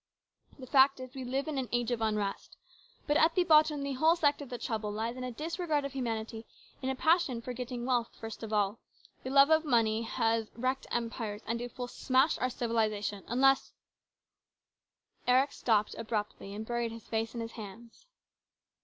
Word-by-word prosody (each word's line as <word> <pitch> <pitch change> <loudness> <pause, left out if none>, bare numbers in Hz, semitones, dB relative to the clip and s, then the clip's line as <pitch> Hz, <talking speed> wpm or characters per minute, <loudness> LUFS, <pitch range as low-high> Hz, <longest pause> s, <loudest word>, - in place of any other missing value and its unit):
The 260 - -9
fact 270 +1 +5
is 255 -1 -8
we 265 - -6
live 265 +4 -2
in 295 -3 -2
an 255 - -3
age 240 0 0
of 235 -2 -1
unrest. 210 -2 -2 0.5
But 295 0 +2
at 320 +1 +4
the 360 - +4
bottom 305 -3 +4
the 280 0 -2
whole 315 +6 +4
secret 295 -4 +2
of 280 - -8
the 245 - -4
trouble 220 -4 -3
lies 225 +3 -3
in 255 - -6
a 250 - -3
disregard 315 +1 -2
of 280 - -5
humanity 225 -3 -4 0.3
in 265 - -2
a 265 - -1
passion 315 -5 +2
for 250 +2 -6
getting 245 -1 -5
wealth 245 -2 +1
first 225 -1 -7
of 225 -1 -6
all. 210 0 +1 0.4
The 260 - -5
love 275 +3 +6
of 315 0 +5
money 230 -6 +2
has 225 -1 0
wrecked 255 +3 -2
empires, 230 -3 -3
and 235 +1 -2
it 245 0 -7
will 250 -1 -3
smash 260 +4 +2
our 255 - +1
civilisation, 215 -4 -1
unless 270 +2 +3 0.8
" - - -42
Eric 260 +3 +4
stopped 215 -6 +1
abruptly 215 -3 -4
and 215 +1 -5
buried 235 0 -2
his 230 0 -10
face 225 +1 -2
in - - -3
his 230 0 -5
hands. 225 - -11
245 Hz, 190 wpm, -31 LUFS, 225-270 Hz, 0.8 s, love